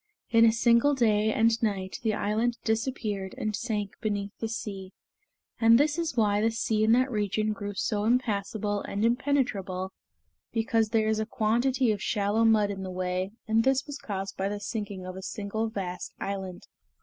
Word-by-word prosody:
In 230 Hz, 0 st, +6 dB
a 225 Hz, -, +6 dB
single 235 Hz, +5 st, +4 dB
day 220 Hz, -3 st, +3 dB
and 225 Hz, +1 st, +2 dB
night 195 Hz, -4 st, -2 dB
the 220 Hz, -2 st, 0 dB
island 225 Hz, +4 st, 0 dB
disappeared 220 Hz, -4 st, -2 dB
and 215 Hz, -1 st, -2 dB
sank 210 Hz, -3 st, -2 dB
beneath 205 Hz, -2 st, -2 dB
the 225 Hz, -, -2 dB
sea; 195 Hz, -4 st, -6 dB, 0.7 s
and 230 Hz, 0 st, +7 dB
this 295 Hz, +3 st, +2 dB
is 320 Hz, -6 st, -2 dB
why 205 Hz, -2 st, +3 dB
the 225 Hz, -, +3 dB
sea 220 Hz, -1 st, 0 dB
in 220 Hz, -, +4 dB
that 255 Hz, +2 st, +3 dB
region 215 Hz, 0 st, 0 dB
grew 205 Hz, -1 st, -6 dB
so 210 Hz, +1 st, -1 dB
impassable 210 Hz, -3 st, 0 dB
and 205 Hz, +3 st, -2 dB
impenetrable, 230 Hz, -8 st, 0 dB, 0.6 s
because 225 Hz, -1 st, +1 dB
there 220 Hz, -1 st, +2 dB
is 220 Hz, 0 st, +1 dB
a 220 Hz, -, -2 dB
quantity 240 Hz, +3 st, +1 dB
of 205 Hz, -2 st, -2 dB
shallow 210 Hz, +1 st, +1 dB
mud 215 Hz, -2 st, +4 dB
in 195 Hz, -1 st, -5 dB
the 190 Hz, -, -5 dB
way, 185 Hz, +1 st, -2 dB
and 225 Hz, +1 st, +3 dB
this 265 Hz, +1 st, +2 dB
was 290 Hz, -1 st, -7 dB
caused 195 Hz, -2 st, -5 dB
by 195 Hz, +1 st, -1 dB
the 205 Hz, 0 st, -4 dB
sinking 205 Hz, -3 st, -5 dB
of 185 Hz, 0 st, -6 dB
a 190 Hz, -, -7 dB
single 215 Hz, +3 st, -3 dB
vast 185 Hz, -4 st, -5 dB
island." 190 Hz, -2 st, -5 dB
215 Hz, 180 wpm, -28 LUFS, 200-230 Hz, 0.7 s, and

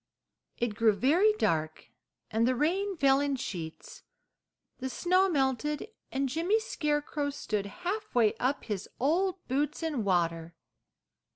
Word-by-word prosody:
It 235 Hz, -2 st, -1 dB
grew 225 Hz, 0 st, +4 dB
very 310 Hz, -, +4 dB
dark, 155 Hz, -, -1 dB, 0.4 s
and 225 Hz, +2 st, +2 dB
the 255 Hz, -, +2 dB
rain 370 Hz, +8 st, 0 dB
fell 270 Hz, -2 st, +4 dB
in 285 Hz, -1 st, 0 dB
sheets, 170 Hz, -10 st, -6 dB, 0.8 s
the 260 Hz, 0 st, -3 dB
snow 365 Hz, +7 st, +2 dB
melted, 290 Hz, -, 0 dB, 0.2 s
and 270 Hz, +1 st, 0 dB
Jimmy 335 Hz, -, +1 dB
Scarecrow 295 Hz, -7 st, -1 dB
stood 210 Hz, -7 st, -3 dB
halfway 355 Hz, -, 0 dB
up 265 Hz, +3 st, 0 dB
his 210 Hz, -3 st, -4 dB
old 360 Hz, +7 st, 0 dB
boots 290 Hz, +5 st, -1 dB
in 300 Hz, -8 st, -1 dB
water. 170 Hz, -3 st, 0 dB
275 Hz, 125 wpm, -30 LUFS, 220-335 Hz, 0.8 s, grew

